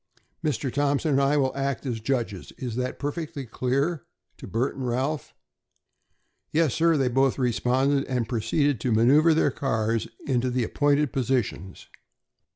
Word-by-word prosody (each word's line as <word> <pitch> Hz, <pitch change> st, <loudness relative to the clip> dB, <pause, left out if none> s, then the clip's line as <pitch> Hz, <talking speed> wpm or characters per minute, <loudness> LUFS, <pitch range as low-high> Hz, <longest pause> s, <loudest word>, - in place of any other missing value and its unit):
Mr. 135 Hz, -4 st, -1 dB
Thompson 145 Hz, +2 st, +1 dB
and 140 Hz, 0 st, +3 dB
I 140 Hz, +2 st, +3 dB
will 135 Hz, -2 st, +1 dB
act 140 Hz, 0 st, -2 dB
as 120 Hz, -4 st, -2 dB
judges. 110 Hz, -5 st, -2 dB
Is 120 Hz, -3 st, -5 dB
that 125 Hz, +1 st, -2 dB
perfectly 145 Hz, -1 st, -4 dB
clear?" 135 Hz, +6 st, -1 dB, 0.3 s
to -, -, -10 dB
Bert 120 Hz, +5 st, -1 dB
and 130 Hz, -2 st, -4 dB
Ralph. 135 Hz, +5 st, -2 dB, 1.2 s
"Yes, 155 Hz, -4 st, +2 dB
sir," 165 Hz, -1 st, +3 dB
they 135 Hz, -2 st, +2 dB
both 135 Hz, +1 st, +2 dB
responded, 130 Hz, +3 st, +1 dB
and 125 Hz, -4 st, -1 dB
proceeded 130 Hz, +3 st, 0 dB
to 125 Hz, -, 0 dB
manoeuvre 145 Hz, +9 st, +5 dB
their 150 Hz, -2 st, +3 dB
cars 115 Hz, -4 st, -1 dB, 0.2 s
into 130 Hz, -2 st, +1 dB
the 125 Hz, 0 st, 0 dB
appointed 145 Hz, +4 st, +1 dB
positions. 125 Hz, -7 st, -2 dB
135 Hz, 150 wpm, -26 LUFS, 120-145 Hz, 1.2 s, manoeuvre